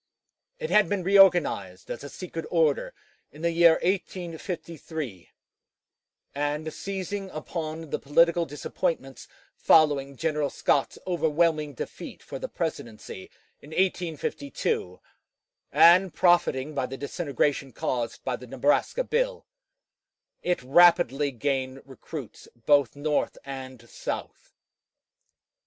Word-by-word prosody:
It 475 -1 -5
had 210 -5 +5
been 200 -3 -1
reorganized 175 - +3
as 120 - -6
a 145 - -7
secret 165 -1 -7
order 160 -4 +1 0.4
in 155 +3 -12
the 170 - +2
year 170 0 +6
1853; 165 - -4 1.0
and 145 +2 -2
seizing 195 0 -4
upon 160 -1 -6
the - - -1
political 170 +4 +3
disappointments 145 -1 -3 0.3
following 140 -3 +3
General 150 -2 0
Scott's 140 - 0
overwhelming 160 -3 +1
defeat - - -8
for - - -7
the - - -5
presidency 115 - -5 0.3
in 145 - -14
1852, 155 - -2 0.7
and 180 +1 +6
profiting 155 -5 +3
by 130 -3 -1
the 135 +1 -7
disintegration 140 -2 -1
caused 120 -1 -3
by 130 - -1
the 125 - -11
Nebraska 145 - +1
bill, - - -1 1.0
it 180 -7 -1
rapidly 155 -1 +5
gained 135 0 -2
recruits 135 -1 -9 0.2
both 145 -5 +4
North 150 +1 -1
and 130 -3 -8
South. - - -6
155 Hz, 110 wpm, -26 LUFS, 135-175 Hz, 1.0 s, year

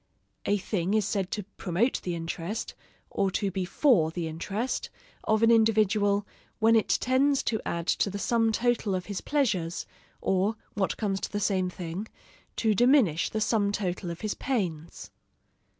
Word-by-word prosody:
A 205 - +3
thing 195 0 -1
is 215 -3 +2
said 195 -3 -1
to 210 - -3
promote 195 +8 0
the 175 -2 -3
interest, 170 +5 -4 0.4
or 195 -1 +1
to 200 -2 -1
be 185 0 -2
for 190 - +3
the 165 0 -4
interest, 195 +10 -3 0.4
of 220 +1 +2
an 230 - +6
individual, 210 -2 +3 0.3
when 225 +1 +4
it 220 - +3
tends 270 +2 +2
to 220 - -1
add 170 -1 -2 0.2
to - - +3
the 200 - -4
sum 225 +2 +2
total 230 -3 +1
of 185 -1 -3
his 200 -2 -4
pleasures: 205 - 0 0.3
or, 195 +3 +1 0.2
what 195 -2 -1
comes 195 -3 -1
to - - -4
the 205 - -1
same 190 -2 +1
thing, 180 +3 -6 0.5
to 220 -2 +2
diminish 240 - +4
the 220 - -2
sum 210 -2 +2
total 185 -3 -2
of 170 0 -6
his 215 -2 -1
pains. 175 - -3
205 Hz, 165 wpm, -28 LUFS, 180-225 Hz, 0.5 s, an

